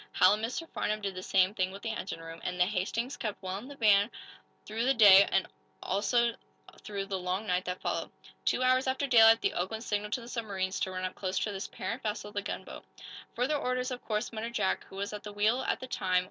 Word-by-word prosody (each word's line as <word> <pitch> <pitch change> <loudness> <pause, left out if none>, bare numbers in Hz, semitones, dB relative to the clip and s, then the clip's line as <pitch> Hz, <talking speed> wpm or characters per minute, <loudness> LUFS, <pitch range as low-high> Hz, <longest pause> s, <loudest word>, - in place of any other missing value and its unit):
Hal 185 +2 +6
and 215 +1 -2
Mr. 255 +8 -3
Farnum 215 -7 -2
did 200 -2 -3
the 185 - -6
same 185 +1 +3
thing 185 -3 0
with 195 +1 -10
the 225 - -2
engine 190 - -5
room, 165 0 -9
and 180 0 -3
the 180 - +5
"Hastings" 215 +6 -2
kept 215 -5 -4
well 185 +1 -3
in 240 - -11
the 285 - -9
van 210 -4 +4 0.6
through 220 +2 -2
the 270 +1 +3
day, 200 -3 +8
and 190 - +2 0.4
also 235 +4 +1 0.5
through 200 -2 -4
the 195 -1 -3
long 185 +3 -2
night 180 -2 0
that 180 0 -4
followed. - - -2 0.3
Two 255 - +1
hours 255 +1 +3
after 265 +2 0
daylight 225 -3 +7
the - - +1
"Oakland" 220 +6 -3
signaled 210 -2 -2
to 255 - -1
the 235 - -10
submarines 195 -6 -3
to - - -1
run 185 0 -3
up 185 - -3
close 185 -1 -3
to 210 - 0
this 195 -1 -5
"parent 235 +4 -5
vessel," 210 -2 -4
the 205 -1 -2
gunboat. - - -6 0.5
"Further 250 +5 +1
orders, 255 -1 -1
of 250 - -5
course," 215 +1 -2
muttered 230 +2 -5
Jack, 190 - 0
who - - -14
was 200 +2 -4
at 210 - -5
the 210 - -8
wheel 215 +5 +2
at - - 0
the - - -6
time. 185 -7 +1
210 Hz, 240 wpm, -30 LUFS, 190-235 Hz, 0.6 s, day